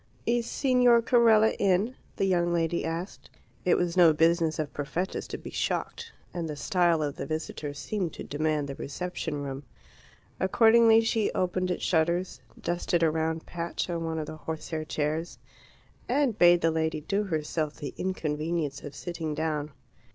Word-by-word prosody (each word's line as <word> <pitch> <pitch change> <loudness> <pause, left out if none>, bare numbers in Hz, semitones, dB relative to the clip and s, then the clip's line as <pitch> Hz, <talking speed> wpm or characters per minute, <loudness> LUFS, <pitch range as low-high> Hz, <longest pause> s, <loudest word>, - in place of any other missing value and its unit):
"Is 235 0 +1
Signor 250 -3 +4
Carella 225 -3 +5
in?" 200 +5 +2 0.2
the - - 0
young 175 -2 +2
lady 170 0 0
asked. 165 +4 -5 0.4
It 180 - +4
was 175 -1 -1
no 170 -3 +7
business 165 0 +2
of 155 -2 -3
Perfetta's 170 +6 -3
to - - -5
be - - -9
shocked, 465 -1 -3 0.2
and 170 -2 -3
the 150 - -4
style 170 -1 +2
of 145 -2 -3
the 135 - -5
visitor 155 -2 -4
seemed 185 +1 -3
to - - -7
demand 150 0 -1
the 140 - -5
reception 150 0 -4
room. 135 0 -5 0.8
Accordingly 225 +3 +5
she 225 -1 +1
opened 185 0 0
its 180 - -2
shutters, 170 +2 0 0.2
dusted 175 0 0
a 160 - +4
round 160 0 -2
patch 170 +1 -4
on 170 -1 -2
one 160 0 -2
of 155 - -2
the 155 - -8
horsehair 160 0 -5
chairs, 155 +2 -2 0.7
and 265 -3 +2
bade 175 -2 +6
the 165 - +3
lady 160 -1 -1
do 200 +7 -1
herself 155 -3 -2
the 140 -3 -6
inconvenience 155 -4 -2
of 145 -1 -9
sitting 165 -2 -4
down. 150 -2 -2
170 Hz, 165 wpm, -28 LUFS, 155-185 Hz, 0.8 s, no